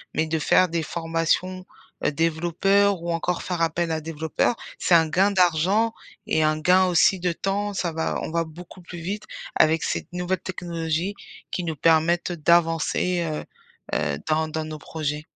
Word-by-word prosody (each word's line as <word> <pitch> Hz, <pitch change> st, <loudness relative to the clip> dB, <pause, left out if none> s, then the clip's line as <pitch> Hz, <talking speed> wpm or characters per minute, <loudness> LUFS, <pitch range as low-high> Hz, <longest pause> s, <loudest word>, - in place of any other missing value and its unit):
mais 160 Hz, -, +2 dB
de 160 Hz, 0 st, -1 dB
faire 185 Hz, +4 st, +4 dB
des 165 Hz, -1 st, -1 dB
formations, 165 Hz, +3 st, -1 dB, 0.4 s
heu, -, -, +3 dB
développeurs 175 Hz, +5 st, +2 dB
ou 170 Hz, 0 st, -3 dB
encore 170 Hz, +1 st, -1 dB
faire 175 Hz, -2 st, -3 dB
appel 165 Hz, +1 st, 0 dB
à 160 Hz, 0 st, -1 dB
développeur, 160 Hz, +8 st, -1 dB, 0.2 s
c'est 175 Hz, -, +3 dB
un 160 Hz, -1 st, +5 dB
gain 195 Hz, +5 st, +3 dB
d'argent 190 Hz, +5 st, +2 dB, 0.3 s
et 155 Hz, -, +2 dB
un 155 Hz, 0 st, +2 dB
gain 185 Hz, +4 st, +4 dB
aussi 180 Hz, +1 st, +4 dB
de 180 Hz, 0 st, 0 dB
temps, 200 Hz, +3 st, -2 dB
ça 180 Hz, -3 st, -1 dB
va 160 Hz, -, -1 dB
on -, -, -4 dB
va 170 Hz, 0 st, +1 dB
beaucoup 175 Hz, +3 st, -12 dB
plus 175 Hz, 0 st, -9 dB
vite 200 Hz, +5 st, -4 dB, 0.3 s
avec 155 Hz, +1 st, +3 dB
cette -, -, -2 dB
nouvelle 180 Hz, +1 st, -1 dB
technologie 170 Hz, 0 st, -3 dB, 0.4 s
qui 180 Hz, -, -2 dB
nous 160 Hz, -1 st, -3 dB
permettent 165 Hz, +4 st, +2 dB
d'avancer, 170 Hz, +2 st, +2 dB
heu 155 Hz, -, -4 dB, 0.5 s
heu, -, -, 0 dB
dans 155 Hz, +1 st, +2 dB
dans 155 Hz, 0 st, -3 dB
nos 155 Hz, 0 st, -6 dB
projets. 150 Hz, -1 st, -4 dB
170 Hz, 170 wpm, -24 LUFS, 160-180 Hz, 0.5 s, un